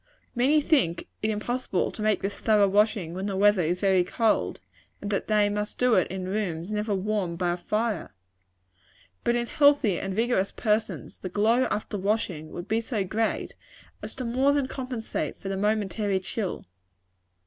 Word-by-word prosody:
"Many 275 +5 +3
think 265 - +1
it 215 - 0
impossible 215 -1 -1
to - - -8
make 215 -1 +1
this 200 +1 -2
thorough 210 -1 +3
washing 205 -4 +2
when 190 +3 -3
the 195 -2 -2
weather 205 -1 +5
is 175 +2 -1
very 190 -2 +4
cold, 220 +4 0 0.4
and 205 - -5
that 200 - -1
they 210 -1 +3
must 210 0 -3
do 250 -1 +3
it 185 -5 +4
in 185 0 -5
rooms 185 -3 -2
never 210 0 -1
warmed 190 -3 -1
by 175 -1 0
a 175 - -2
fire; 215 +1 -2 1.1
but 235 - +2
in 240 0 0
healthy 285 - +3
and 195 -1 -4
vigorous 225 -3 +1
persons, 220 -1 -1
the 185 - -5
glow 225 +7 +3
after 210 -1 -3
washing 185 -6 -1
would 175 +2 -7
be 225 +1 +1
so 225 -3 -2
great, 220 +4 -2 0.5
as - - -7
to 255 - -4
more 260 +4 +2
than 285 -2 +1
compensate 255 -4 -4
for 195 - -6
the 195 - -1
momentary 205 -1 0
chill." 190 +1 -4
210 Hz, 175 wpm, -26 LUFS, 190-225 Hz, 1.1 s, weather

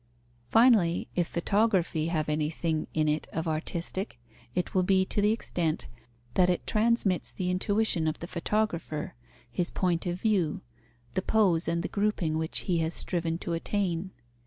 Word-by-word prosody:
Finally, 225 -8 +4
if 175 -2 +1
photography 180 -4 +1
have 160 -3 -1
anything 155 +1 -1
in 155 -1 +1
it 150 +1 0
of 160 +1 -3
artistic, 170 - -3 0.4
it 180 - -1
will 185 - +3
be 190 +1 +3
to 205 - 0
the 210 +1 +4
extent 175 -8 -1 0.5
that 180 -1 +4
it 180 - 0
transmits 215 -4 +2
the 180 -1 -2
intuition 190 -3 +1
of 155 - -1
the - - -6
photographer, 170 -4 -2 0.4
his 170 +8 -1
point 180 -1 0
of 175 +1 -2
view, 185 -7 +1 0.5
the 185 - 0
pose 185 -5 +2
and 170 0 0
the - - -1
grouping 200 -6 0
which 160 0 -1
he 175 -3 0
has 160 +1 0
striven 165 -2 -1
to 170 - -4
attain. 180 0 -1
175 Hz, 160 wpm, -28 LUFS, 165-200 Hz, 0.5 s, Finally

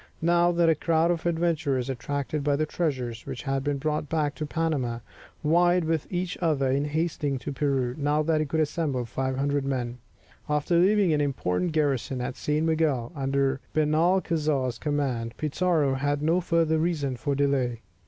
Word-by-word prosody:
Now 175 +1 +4
that 170 -1 +3
a 165 - +6
crowd 165 +2 +2
of 170 0 -2
adventurers, 160 -6 0
attracted 140 +3 -3
by 145 0 +2
the 155 +2 0
treasures 130 -8 -3
which - - -5
had 135 -1 -1
been 145 0 0
brought 150 0 -2
back 150 -2 0
to 150 - -5
Panama, 145 -8 -1 0.5
vied 175 +3 +3
with 160 -2 -2
each 180 0 -2
other 145 -6 +1
in 140 +2 +1
hastening 150 -2 -1
to 130 - -5
Peru, 135 -3 0
now 150 +1 +1
that 155 0 +1
he 155 - 0
could 160 +3 0
assemble 145 -5 -1
500 135 +3 -1
men 125 -3 -3 0.5
after 150 +3 +1
leaving 195 -1 +4
an 150 - +2
important 140 - -1
garrison 140 -4 0
at 125 +1 -3
San 150 +2 0
Miguel 155 -6 +1
under 135 0 0 0.2
Benalcazar's 155 -4 +1
command, 130 -6 -2
Pizarro 155 -2 +1
had 145 +2 -1
no 165 +4 +2
further 165 -2 +2
reason 155 -5 0
for 140 +3 -2
delay. 135 -4 0
150 Hz, 165 wpm, -26 LUFS, 135-160 Hz, 0.5 s, a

